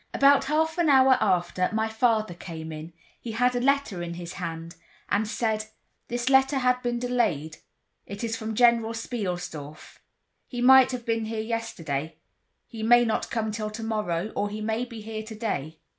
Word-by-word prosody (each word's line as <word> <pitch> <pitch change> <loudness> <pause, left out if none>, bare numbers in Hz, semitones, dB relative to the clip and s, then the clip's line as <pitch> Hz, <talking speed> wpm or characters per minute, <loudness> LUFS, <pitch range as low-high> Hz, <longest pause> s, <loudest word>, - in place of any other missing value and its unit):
About 280 0 +5
half 320 +3 0
an 335 -3 +3
hour 265 -1 +6
after 180 -2 +1
my 220 0 +1
father 220 -3 +1
came 160 -2 -8
in—he 165 +8 -10
had 250 +2 +2
a - - +1
letter 275 -8 +1
in 170 0 -5
his 175 0 -7
hand—and 170 +4 -4
said: 215 -1 -1 0.4
"This 240 +1 -3
letter 265 +1 +4
had 250 -1 +2
been 240 -1 -1
delayed; 220 - -1 0.5
it 200 +2 -7
is 225 -1 -1
from 220 -1 -5
General 235 -1 +4
Spielsdorf. 180 - -5 0.5
He 245 - -6
might 260 +1 +7
have 245 -2 -5
been 225 -1 0
here 220 0 -4
yesterday, 170 -10 -3 0.5
he 225 -2 -9
may 240 +2 +5
not 220 - -1
come 220 -2 -1
till 215 0 -3
tomorrow 215 -4 -2
or 205 - -1
he 210 +1 -6
may 220 +3 -1
be 230 -3 -9
here 215 0 -5
today." 215 - -4
220 Hz, 165 wpm, -26 LUFS, 180-245 Hz, 0.5 s, might